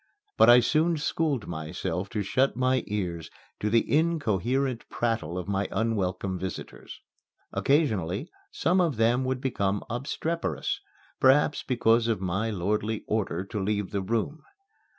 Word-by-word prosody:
But - - +6
I 120 +1 +9
soon 160 +6 +2
schooled 150 -4 -1
myself 85 +3 -4
to 105 -3 -2
shut 130 +7 +1
my 130 +1 +1
ears 90 -6 -3 0.3
to 105 - 0
the 115 +1 +3
incoherent 135 - 0
prattle 110 -8 -1
of 90 0 -4
my 100 0 0
unwelcome 95 -4 -1
visitors. 95 0 -7 0.5
Occasionally, 110 - +1 0.2
some 180 +3 +2
of 160 -9 0
them 120 +3 +3
would 130 0 -1
become 100 -6 -1
obstreperous 165 - -2 0.4
perhaps 145 +2 +4
because 115 -2 +2
of 110 -4 0
my 95 +4 -1
lordly 105 +2 -1
order 95 -5 -1
to 105 +1 -4
leave 105 0 -1
the 100 - -1
room. 115 +9 -2
115 Hz, 135 wpm, -27 LUFS, 95-135 Hz, 0.5 s, I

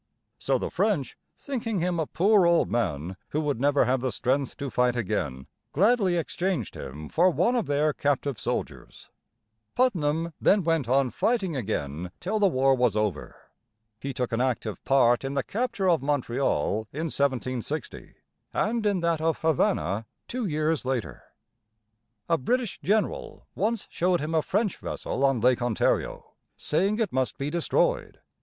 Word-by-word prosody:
So - - +1
the - - -4
French, - - 0 0.2
thinking 230 -7 -3
him 175 0 0
a 160 - -1
poor 195 +1 +4
old 170 - +3
man 95 -6 -1
who 155 - -1
would 145 -5 -1
never 145 0 +3
have 130 0 +1
the 130 -1 -1
strength 130 +5 -1
to 140 -2 -4
fight 125 -1 +2
again, 65 - -2 0.3
gladly 195 - +3
exchanged 170 - -2
him 75 +3 -7
for 175 +3 +3
one 235 +7 +2
of 235 - 0
their 145 +1 +2
captive 140 -4 -1
soldiers. - - -5 0.6
Putnam 165 -9 +1
then 200 -1 +4
went 165 -7 0
on 135 -1 +3
fighting 190 - 0
again 90 - -3
till 215 +4 -1
the 205 - +5
war 135 -5 +3
was 125 -5 +2
over. 105 -7 -2 0.6
He 140 - -4
took 125 -2 -3
an 115 +1 0
active 120 -4 -2
part 120 -3 +4
in 135 +1 -3
the 140 - +1
capture 225 -4 -1
of 170 -6 +3
Montreal 130 -5 0
in 155 +4 -4
1760, 135 -1 -2 0.4
and 225 +2 0
in 195 -4 +1
that 170 -2 +1
of 160 0 +1
Havana 150 - +1 0.2
two 245 -3 -3
years 155 -1 0
later. 130 -3 -3 1.0
A 165 -1 +2
British 245 - -1
general 210 +2 -1
once 220 +2 -1
showed 180 0 +1
him 155 +2 -3
a 160 - +3
French 205 +4 0
vessel 135 - -4
on 135 -4 +3
Lake 125 +1 +3
Ontario, 120 -3 0 0.2
saying 195 +7 +1
it 225 - -1
must 130 -1 0
be 140 +2 -3
destroyed. - - 0
145 Hz, 160 wpm, -26 LUFS, 125-185 Hz, 1.0 s, the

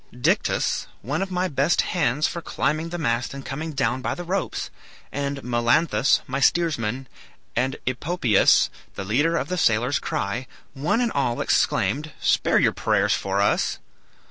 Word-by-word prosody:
Dictys, - - 0 0.2
one 145 +8 -2
of 195 - -2
my 180 0 0
best 140 +1 +2
hands 150 -4 0
for 170 - -5
climbing 155 +1 -1
the 175 - -4
mast 120 -4 -1
and 140 - -8
coming 155 +4 -4
down 130 -3 0
by - - -2
the 175 - -6
ropes, 185 +2 -3 0.4
and 140 -1 -3
Melanthus, 125 +3 +2
my 135 +1 -3
steersman, 135 -6 +1 0.5
and 130 +3 0
Epopeus, 130 - +3 0.2
the 95 - -5
leader 145 - +2
of - - -2
the 180 0 -2
sailor's 120 +2 +2
cry, 115 +6 -3 0.3
one 155 - 0
and 235 -2 +1
all 125 -4 0
exclaimed, 145 +10 +1
'Spare - - +2
your - - +3
prayers - - +1
for 100 +1 -1
us.' 100 - +1
140 Hz, 155 wpm, -24 LUFS, 120-165 Hz, 0.5 s, Epopeus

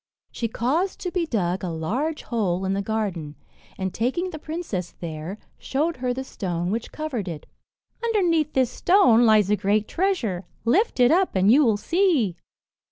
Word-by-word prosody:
She 230 - -2
caused 285 - -1
to 360 - -3
be 345 -2 -1
dug 190 - -1
a 180 - -2
large 230 - -2
hole 195 -6 -1
in 190 - 0
the 200 - 0
garden, 195 -8 -3 0.4
and 190 -1 -3
taking 345 +11 -1
the 310 - -7
princess 310 - -5
there, 165 +3 -6 0.2
showed 310 +4 -1
her 250 0 -1
the 260 +2 -3
stone 175 -7 -3
which 225 +2 -3
covered 275 -11 -4
it. 160 -4 -6 0.6
"Underneath 345 -9 +1
this 255 -2 +2
stone 250 - +4
lies 210 -2 +4
a - - +5
great 205 +1 +1
treasure; 265 - -1 0.2
lift 355 - +2
it 245 0 +6
up, 370 - +2
and 190 +2 +4
you 290 +5 +6
will 225 -5 +3
see." 315 - +1
230 Hz, 170 wpm, -24 LUFS, 190-315 Hz, 0.6 s, it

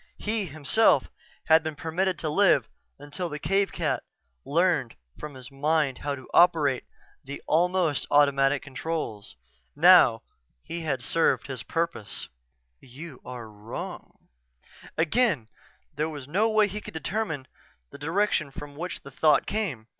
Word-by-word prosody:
He, 215 -1 -2
himself, 155 +9 +3 0.3
had 160 0 +6
been 160 -1 -5
permitted 175 +4 -1
to 160 - -3
live 150 - +3 0.3
until 145 +5 -5
the 150 - -5
cave 195 +5 +1
cat - - -1 0.4
learned 160 -6 +1 0.2
from 150 -2 -7
his 130 -1 -11
mind 145 -1 0
how 145 -1 -2
to 130 -2 -12
operate 150 -7 +4 0.4
the 140 +1 -7
almost 175 -2 +1
automatic 140 -1 +3
controls. 135 - -5 0.4
Now, 150 -8 +6 0.4
he 170 0 -5
had 135 -6 -2
served 165 +5 +1
his 130 -3 -5
purpose 165 - -3 0.5
"You 135 +2 -11
are 125 -3 -8
wrong." 105 +1 -9 0.7
Again 165 - +1 0.4
there 155 +2 -1
was 145 -4 -8
no 205 +9 +2
way 215 -1 +4
he 210 +2 -6
could - - -10
determine 160 -5 -3 0.5
the - - -11
direction 160 0 0
from 145 +1 -9
which 175 +4 -5
the 140 - -11
thought 150 +2 +3
came. 180 - -3
150 Hz, 140 wpm, -26 LUFS, 135-175 Hz, 0.7 s, had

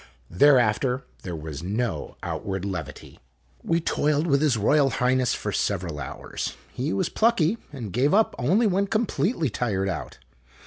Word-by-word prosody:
Thereafter 125 - +4 0.2
there 90 -2 -5
was 75 -2 -6
no 110 +7 -3
outward 95 -1 -3
levity. 90 -5 -6 0.4
We 165 - +1
toiled 150 -1 +1
with 140 -4 +2
His 145 -7 +3
Royal 140 +6 +3
Highness 125 0 +1
for - - -3
several 85 -4 -1
hours. 70 - -5 0.2
He 135 +6 -2
was 185 - 0
plucky, 220 -3 +2
and 120 -9 -7
gave 130 +5 +2
up 215 +3 +3
only 190 - +3
when 200 0 +2
completely 205 - 0
tired 100 -4 -1
out. 90 - -5
130 Hz, 145 wpm, -25 LUFS, 100-160 Hz, 0.4 s, Thereafter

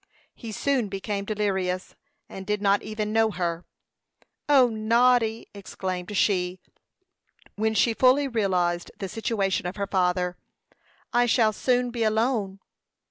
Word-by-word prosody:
He 230 -3 -8
soon 255 +1 0
became 200 +1 -4
delirious, 190 -3 -2 0.3
and 190 0 -9
did 210 0 0
not 200 0 +2
even 215 0 -4
know 225 0 +3
her. 175 -4 -3 0.8
"O, 270 -4 +6
Noddy," 230 0 +2
exclaimed 190 -1 -5
she, 180 -2 +1 1.0
when 220 +1 0
she 230 +2 +3
fully 260 +4 +4
realized 180 -7 0
the 195 - -4
situation 195 -3 -1
of 180 - -5
her 200 -1 -2
father, 180 -2 0 0.8
"I 240 0 +3
shall 225 -2 +3
soon 245 +2 0
be 235 -1 -5
alone." 220 -3 0
210 Hz, 130 wpm, -25 LUFS, 190-230 Hz, 1.0 s, O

